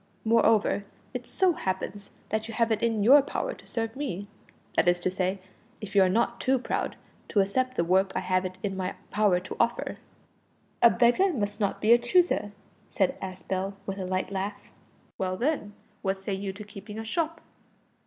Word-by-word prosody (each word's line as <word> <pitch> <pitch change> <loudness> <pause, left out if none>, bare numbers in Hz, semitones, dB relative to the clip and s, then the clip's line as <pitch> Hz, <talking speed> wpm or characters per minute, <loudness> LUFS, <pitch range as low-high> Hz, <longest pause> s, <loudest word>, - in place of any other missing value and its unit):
Moreover, 220 -2 +3 0.3
it 245 -1 -5
so 375 -2 +2
happens 195 - -4 0.2
that 220 0 -1
you 225 - -7
have 230 -1 +2
it 220 - +1
in 225 -3 +1
your 275 +6 +8
power - - -3
to - - -15
serve 225 -1 -3
me 220 -9 -4 0.5
that - - +3
is 175 0 +4
to 185 - 0
say, 185 +1 -1 0.4
if 205 -2 -8
you 200 - +7
are 185 - +5
not 235 +4 +1
too 265 +1 +3
proud 250 - -2 0.3
to 205 - +1
accept 255 +7 +1
the - - +2
work 190 +3 +3
I - - 0
have 185 0 +1
it 185 0 -5
in 195 -2 -1
my 185 0 -3 0.2
power 205 -4 +3
to 185 - -7
offer." 235 +1 0 0.8
"A 235 - +9
beggar 245 +13 +4
must 205 -7 -2
not 200 -2 0
be 215 - +4
a 240 - +8
chooser," 245 - +2 0.4
said 190 -2 +1
Aspel, 190 +1 -3
with 195 0 -4
a 190 - -3
light 185 +1 -1
laugh. 200 +1 -4 0.5
"Well, 185 -1 -1
then, 255 -5 -1 0.3
what 195 0 0
say 195 +1 -4
you 195 0 -3
to 200 +3 -9
keeping 205 +1 -10
a 225 - -5
shop?" 330 +6 -1
205 Hz, 195 wpm, -28 LUFS, 190-235 Hz, 0.8 s, A